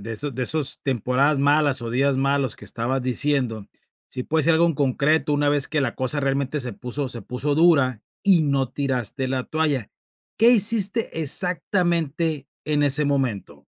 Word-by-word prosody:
de 115 +3 -6
esos 140 +2 -3
de 130 - -3
esas 150 0 +2
temporadas 135 +3 +1
malas, 145 -2 +2
o 115 - -5
días 135 +2 +1
malos 135 -3 0
que - - -13
estabas 125 +3 -3
diciendo, 125 -5 -1 0.4
sí 125 - -6
puede 155 +1 0
ser 165 - +3
algo 165 +1 +3
en 165 - 0
concreto 145 +2 +1
una 145 0 +1
vez 145 -1 +2
que 150 -2 -1
la 125 -3 -2
cosa 130 +3 0
realmente 140 +1 -1
se 125 -3 -4
puso 130 +5 -5
se 120 - -3
puso 130 +7 -2
dura 140 -8 +3 0.2
y 195 -4 +4
no 135 -3 0
tiraste 130 -2 -2
la 130 -1 -2
toalla, 150 -8 -2 0.5
¿qué 230 +2 +6
hiciste 215 -4 +2
exactamente 165 -3 0 0.2
en 150 -1 0
ese 145 +1 +3
momento? 135 -8 -3
140 Hz, 175 wpm, -22 LUFS, 130-155 Hz, 0.5 s, qué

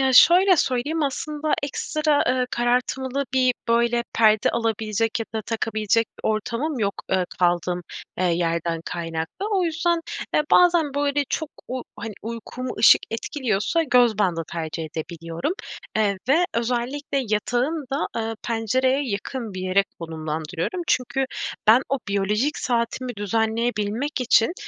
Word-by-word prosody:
Ya, 265 -1 +3
şöyle 365 +7 +7
söyleyeyim 290 +4 0
aslında 300 +2 -1
ekstra, 300 +1 0
eee, 250 0 +2
karartmalı 250 +3 0
bir 255 -1 +3
böyle 235 0 +2
perde 215 -2 +4
alabilecek 225 -1 -1
ya 225 - -3
da 220 - -1
takabilecek 220 0 0
bir - - -2
ortamım 235 +7 -1
yok, 200 -3 0 0.2
eee, 185 -1 +2
kaldığım, 175 0 +1 0.4
eee, 185 - +1
yerden 170 -1 0
kaynaklı. 165 - -4
O 380 -3 +2
yüzden, 335 +1 +1 0.3
eee, - - +4
bazen 340 -5 +5
böyle 285 0 +1
çok 315 -2 -2 0.2
u 255 0 -3
hani 225 -2 -6
uykumu 235 +3 -5
ışık 215 - +7
etkiliyorsa 235 - 0
göz 245 -7 +3
bandı 175 -5 +1
tercih 165 -1 -4
edebiliyorum, 165 - -4 0.4
eee, 205 -2 +2
ve 325 +6 +5
özellikle 250 +5 -1
yatağın 245 +8 0
da, 275 - 0
eee, 225 0 -2
pencereye 255 +4 +1
yakın 215 +1 -4
bir 185 - -4
yere 190 +2 +3 0.2
konumlandırıyorum. 160 - -4
Çünkü 255 +1 +1 0.4
ben 230 +5 +7
o 275 - 0
biyolojik 210 +9 0
saatimi 245 0 -1
düzenleyebilmek 225 +4 -1
için, 245 +2 +4
235 Hz, 135 wpm, -23 LUFS, 205-275 Hz, 0.4 s, şöyle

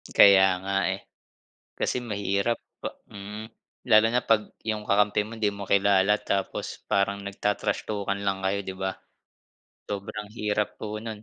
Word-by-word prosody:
Kaya 100 -1 +8 0.2
nga 100 0 -2 0.2
eh. - - -12 0.8
Kasi - - 0
mahirap 100 +2 0 0.2
pa - - -5 0.2
mm. 105 +2 -7 0.5
Lalo 110 +1 +7
na 125 +1 +1
'pag 110 -2 +3 0.2
'yung 105 -1 -2
kakampi 105 +1 +3
mo 115 - -8
hindi 105 -2 +2
mo 100 0 -8
kilala 100 0 +4
tapos 95 -1 -1 0.2
parang 100 0 +2
nagta-trash 105 +1 -1
talk-an 100 -1 -2
lang 95 -1 +1
kayo, 100 +1 +1
'di 95 - -4
ba? 95 0 -2 0.9
Sobrang 105 +1 -5
hirap 105 0 0
po 105 0 -4
nun, 110 -2 -6
100 Hz, 150 wpm, -26 LUFS, 100-105 Hz, 0.9 s, Kaya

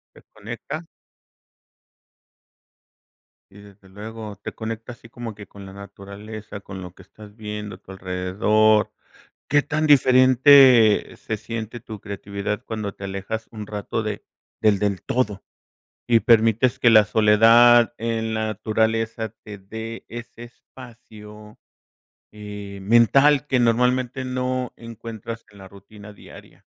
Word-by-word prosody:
¿Te - - -18
conecta? 120 +9 -8 2.7
Y 100 - -15
desde 100 -1 -18
luego, 105 0 -9
te - - -7
conecta 115 +1 -6
así 115 - -17
como 115 -2 -8
que 100 -1 -11
con 100 -1 -13
la 95 - -11
naturaleza, 100 +2 -10
con 95 -1 -9
lo 90 -1 -9
que 95 - -16
estás 105 +2 -16
viendo 105 -1 -7
a - - -16
tu - - -15
alrededor. 95 +4 +1 0.6
¿Qué 145 0 +3
tan 155 +1 -1
diferente 130 -4 +6
se 110 - -5
siente 115 +1 -6
tu 110 -1 -10
creatividad 100 +1 -5
cuando 105 -3 -4
te 100 - -10
alejas 100 +3 -5
un 105 -2 -8
rato 105 +2 -4
de 105 -1 -5 0.4
del 105 -2 +3
del 100 -2 -1
todo? 105 -6 -2 0.7
Y 115 -1 +4
permites 115 +1 +3
que 120 - +4
la 110 -1 +7
soledad 115 +3 +5
en 115 -1 -3
la 110 0 -1
naturaleza 110 +1 -1
te 105 -1 -9
dé 110 +4 -8
ese 120 0 -9
espacio, 110 -4 -14 0.7
eh, 105 -1 -9
¡mental! 135 +7 +4
que 130 -3 +1
normalmente 125 +2 +1
no 130 0 -3
encuentras 115 0 -9
en 100 - -19
la 95 - -11
rutina 100 +2 -14
diaria. - - -16
110 Hz, 130 wpm, -22 LUFS, 105-120 Hz, 2.7 s, la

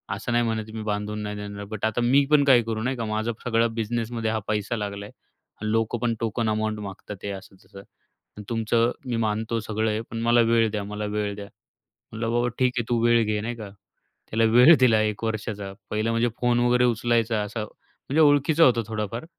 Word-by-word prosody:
असं 125 - -5
नाही 120 0 +2
म्हणत 110 -1 -2
मी 110 - -5
बांधून 105 0 -3
नाही 105 0 -4
देणार, 100 0 -7
बट 110 +1 -4
आता 110 +2 0
मी 135 +4 +4
पण 145 -1 +6
काही 130 -4 +6
करू 110 -1 -3
नाही 130 +1 -1
का, 115 - -3
माझं 110 +2 -1
सगळं 115 -1 +1
बिझनेसमध्ये 115 0 -2
हा 110 - -1
पैसा 105 +2 -1
लागला 100 -1 -5
आहे. - - -13 0.6
लोकं 115 +1 0
पण 120 -1 0
टोकन 115 0 -1
अमाउंट 110 0 -1
मागत 100 0 -8
आहे. 100 - -3
असं 95 0 -11
तसं, 100 0 -13 0.7
तुमचं 115 +1 +1
मी 120 -2 -2
मानतो 110 +2 -1
सगळं 110 0 -2
आहे, 105 +1 -2
पण 115 0 -4
मला 120 +1 +4
वेळ 115 -1 +3
द्या, 105 -2 -3
मला 105 +1 -5
वेळ 105 -1 -1
द्या. 100 0 -7 0.7
म्हटलं 115 +1 -3
बाबा 120 +1 +1
ठीक 125 -1 +3
आहे, 120 - +1
तू 120 -1 +1
वेळ 120 -1 +4
घे 105 0 -1
नाही 120 +2 -4
का. 110 -3 -8 0.6
त्याला 115 +1 +1
वेळ 125 +8 +8
दिला 115 -4 +4
1 105 0 -2
वर्षाचा. 105 -3 -4 0.2
पहिलं 110 +1 -1
म्हणजे 115 +1 +1
फोन 120 -1 +2
वगैरे 125 0 +3
उचलायचा. 115 -1 +1
असा 105 +2 -4
म्हणजे 140 +7 -4
ओळखीचं 145 +2 +4
होतं 120 -5 +5
थोडाफार, 110 +3 -4
115 Hz, 205 wpm, -25 LUFS, 105-120 Hz, 0.7 s, वेळ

